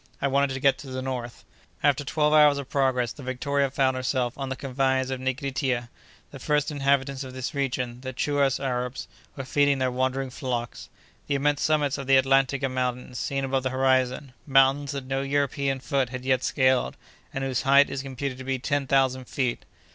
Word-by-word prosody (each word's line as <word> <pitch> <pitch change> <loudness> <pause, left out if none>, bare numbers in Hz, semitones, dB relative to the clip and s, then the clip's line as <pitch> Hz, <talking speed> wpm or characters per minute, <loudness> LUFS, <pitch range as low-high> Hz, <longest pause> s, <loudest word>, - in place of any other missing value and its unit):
I 140 - +1
wanted 140 0 +1
to - - -4
get 135 0 +3
to 145 - -10
the 130 0 -5
north." 125 -3 -5 0.4
After 145 -1 +3
twelve 150 +2 +1
hours 150 -2 +6
of 140 -2 -7
progress, 130 -4 +1
the - - -11
Victoria 140 +2 -1
found 130 -1 +1
herself 130 -1 -1
on 135 -1 -5
the 130 - -2
confines 130 0 0
of 130 - -3
Nigritia. 130 -2 -2 0.4
The 135 - -10
first 150 +2 0
inhabitants 140 -1 0
of 130 -1 -9
this 130 +3 -4
region, 125 -3 -2
the 130 0 -5
Chouas 140 +1 +1
Arabs, 125 -1 -3 0.3
were 135 - -6
feeding 145 +1 +2
their 130 -1 0
wandering 130 +1 -1
flocks. 120 -3 -4 0.4
The 140 - 0
immense 145 +1 +1
summits 150 -3 +1
of 135 - -6
the 135 0 +6
Atlantika 135 +1 +2
Mountains 125 -1 -3
seen 135 -1 -2
above 135 0 0
the 130 - -1
horizon—mountains 130 +1 +2
that 140 -2 -5
no 135 +1 -1
European 140 -1 0
foot 135 -1 -1
had 125 0 -7
yet 130 -1 +2
scaled, 130 -2 +2 0.3
and 135 - -4
whose 130 -3 -1
height 140 +1 +5
is 135 - -3
computed 135 -1 -5
to - - -6
be 135 0 -1
ten 140 +1 -1
thousand 130 -1 +2
feet! 125 -1 -2
135 Hz, 190 wpm, -26 LUFS, 130-140 Hz, 0.4 s, hours